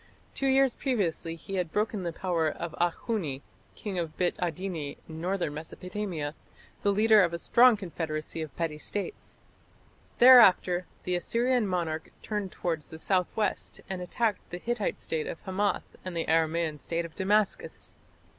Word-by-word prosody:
Two 275 - -1
years 270 -1 +4
previously 180 - -1
he 195 +3 -6
had 175 -3 -1
broken 210 0 0
the 175 -2 -2
power 165 -2 0
of 170 +1 -5
Akhuni, 175 - -1 0.3
king 195 -4 -4
of 165 -2 -4
Bit 180 -1 +1
Adini 175 -4 -3
in 160 0 -8
northern 180 -4 -1
Mesopotamia, 165 0 -4 0.5
the 200 - +3
leader 215 +1 +6
of 170 -2 +2
a - - -1
strong 235 +6 +5
confederacy 160 -4 -4
of 155 -4 -6
petty 160 -3 -2
States. 205 - -5 0.8
Thereafter 195 -8 +7 0.2
the 180 - -1
Assyrian 235 +5 +1
monarch 165 -4 -2
turned 210 -3 -3
towards 165 -4 -3
the 160 - -8
south 180 +2 +1
west 210 -3 -1
and 190 -1 -4
attacked 210 +4 0
the 175 - -5
Hittite 230 +2 -2
State 160 -1 -3
of - - -5
Hamath 200 +2 -1
and 185 -2 -5
the 165 - 0
Aramaean 160 -1 +1
State 170 +2 -2
of 165 - -10
Damascus. 190 - 0
180 Hz, 155 wpm, -29 LUFS, 165-205 Hz, 0.8 s, Thereafter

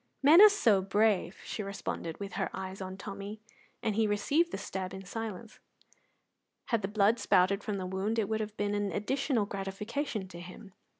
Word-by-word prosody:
"Men 315 +7 +9
are 425 - +11
so 225 - +3
brave!" 200 -2 +1
she - - -4
responded, 195 -5 -5
with 200 -1 -6
her - - -1
eyes 190 0 -6
on 190 0 -6
Tommy, 200 +1 -7 0.4
and 220 - +1
he 220 0 +3
received 280 +12 +2
the - - -3
stab 190 -2 -5
in 190 0 -9
silence. 225 +1 -6 1.1
Had 230 -3 +2
the 195 - -2
blood 210 +2 +3
spouted 195 +1 +3
from 210 -2 -2
the 185 - -4
wound, 190 +4 -2
it 215 -3 +1
would 220 +1 -1
have 215 0 -5
been 205 0 0
an 205 -1 -1
additional 245 - 0
gratification 200 +3 -4
to 170 - -9
him. 185 +3 -11
205 Hz, 185 wpm, -31 LUFS, 190-220 Hz, 1.1 s, are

